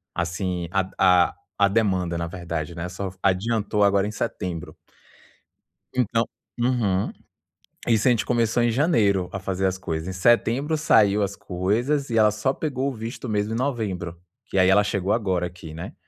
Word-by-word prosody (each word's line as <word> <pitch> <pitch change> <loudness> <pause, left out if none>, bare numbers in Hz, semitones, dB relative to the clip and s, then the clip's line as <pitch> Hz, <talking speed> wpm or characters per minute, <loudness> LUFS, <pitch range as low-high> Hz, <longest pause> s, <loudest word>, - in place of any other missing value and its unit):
assim, 90 0 -2
a 95 -1 0 0.4
a - - -12 0.3
a - - +7
demanda, 95 -5 +1
na 85 - -2
verdade, 85 -2 -5
né? 85 +1 -5
Só 95 +1 -5
adiantou 105 +2 +1
agora 100 0 +3
em - - -4
setembro. 90 -5 -4 1.2
Então 115 -2 +1 0.3
uhum. 115 -6 +1 0.8
Isso 115 0 +3
a - - +6
gente 115 - +1
começou 120 -1 +1
em 120 - +3
janeiro 110 - +2
a 95 - -3
fazer 95 0 -2
as 95 0 +1
coisas. 80 -2 -4
Em 95 - -4
setembro, 120 - +2
saiu 105 -8 +4
as 100 0 -2
coisas. 120 +10 -1
E 115 - +1
ela 105 -1 +6
só 105 +6 0
pegou 140 -2 -2
o - - -5
visto, 115 +3 -6
mesmo, 105 0 -1
em - - -1
novembro. 105 -10 -2 0.4
E 95 - +3
aí, 95 0 +5
ela 105 +2 +5
chegou 100 -1 -1
agora 95 -6 0
aqui, 85 -3 -11
né? 80 - -7
100 Hz, 170 wpm, -24 LUFS, 90-115 Hz, 1.2 s, a